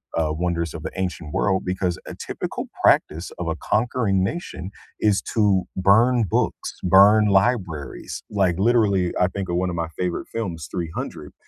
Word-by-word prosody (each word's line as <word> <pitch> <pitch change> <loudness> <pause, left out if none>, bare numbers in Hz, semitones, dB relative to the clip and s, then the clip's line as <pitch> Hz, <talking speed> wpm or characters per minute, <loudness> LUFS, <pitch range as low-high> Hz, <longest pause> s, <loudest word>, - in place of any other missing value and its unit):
uh, 80 -1 +1
Wonders 85 -1 -2
of - - -6
the - - -4
Ancient 85 -5 -4
World 95 -1 +1
because 90 -2 -1
a - - -7
typical - - -5 0.2
practice 80 +4 +3
of 90 - -3
a 80 - -1
conquering 105 -1 0
nation 95 - -4 0.3
is 105 -2 +3
to 100 -4 +3
burn 115 +6 +4
books, - - -1
burn 100 +4 +6
libraries, 95 - 0
like 95 -5 +1
literally, 100 -5 +3
I 90 - +4
think 95 -1 -5
of 85 - -1
one 90 0 0
of - - -4
my 85 -1 -2
favorite 90 -1 -2
films, 85 -9 -4
300, 85 -2 -5
95 Hz, 160 wpm, -23 LUFS, 85-105 Hz, 0.3 s, burn